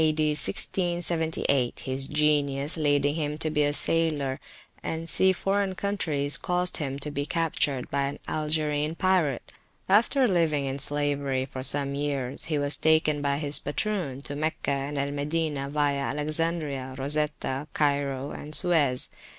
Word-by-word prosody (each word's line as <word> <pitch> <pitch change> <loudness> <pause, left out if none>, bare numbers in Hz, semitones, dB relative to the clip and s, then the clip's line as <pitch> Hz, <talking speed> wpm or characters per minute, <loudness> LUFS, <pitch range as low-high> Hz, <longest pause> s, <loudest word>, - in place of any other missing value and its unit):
D. 155 -1 +2
1678, 160 -6 +1
his 135 +1 -1
genius 145 -1 +2
leading 145 -2 +2
him 150 -1 -2
to 155 0 0
be 150 -1 +1
a 145 0 +3
sailor 145 -4 +1 0.4
and 160 - -3
to 165 - -8
see 190 +2 +4
foreign 195 +1 -1
countries, 155 -8 -1
caused 180 0 -1
him 140 -3 -3
to 145 +1 -3
be 145 0 -3
captured 150 -5 0
by 140 0 0
an 140 - -6
Algerine 150 0 -1
pirate. 175 -8 0 0.4
After 235 +7 +4
living 160 -7 +1
in 135 +1 -3
slavery 140 -2 -1
for 130 -1 -7
some 140 +1 0
years, 140 -2 -3
he 155 - -1
was 145 0 0
taken 155 -2 +3
by 140 -1 0
his 145 -1 +1
patroon 145 -4 -2
to 145 - -4
Meccah 155 -1 -1
and 140 +1 -2
Al 140 0 -1
Madinah 145 -1 -2
via 145 -1 +1
Alexandria, 150 -2 -2
Rosetta, 145 0 -2
Cairo, 140 -2 0
and 150 +1 -5
Suez. 155 -8 +5
145 Hz, 150 wpm, -26 LUFS, 140-160 Hz, 0.4 s, Suez